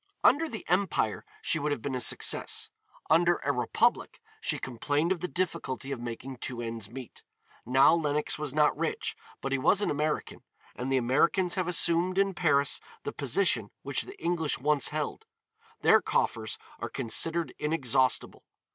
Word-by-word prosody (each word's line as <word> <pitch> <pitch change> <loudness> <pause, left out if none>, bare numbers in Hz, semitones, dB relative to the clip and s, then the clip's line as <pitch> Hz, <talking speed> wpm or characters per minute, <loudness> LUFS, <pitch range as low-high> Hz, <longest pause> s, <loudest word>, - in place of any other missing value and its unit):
Under 315 +4 +4
the 220 - -7
empire 180 - 0 0.2
she 160 - +2
would 150 0 -1
have 125 -6 -3
been 140 - -3
a 130 - -2
success; - - +1 0.4
under 170 +2 +4
a 140 - +1
republic 125 -4 0 0.2
she - - 0
complained 145 +7 -1
of 190 - 0
the 180 - -3
difficulty 170 -7 -3
of 135 - -3
making 120 +2 -6
two 125 0 -4
ends 115 -3 -3
meet. 125 +1 -10 0.5
Now 130 +5 +6
Lenox 150 -2 0
was 150 -2 -2
not 150 +1 +3
rich, - - -2 0.3
but 135 - -3
he 135 - +1
was 195 +9 +4
an 205 - +1
American, 150 +1 -2 0.3
and 130 +2 -4
the 135 - +3
Americans 165 +9 +2
have 185 -2 0
assumed 175 +2 +2
in 195 0 +2
Paris 145 -5 +2 0.2
the - - -4
position - - +1
which - - 0
the 390 - -10
English 170 -3 0
once 145 +1 +2
held. 150 -1 -4 0.5
Their - - +6
coffers 110 -2 -1 0.2
are - - -4
considered 165 +8 +1
inexhaustible. 135 -5 +1
150 Hz, 165 wpm, -29 LUFS, 130-170 Hz, 0.5 s, Now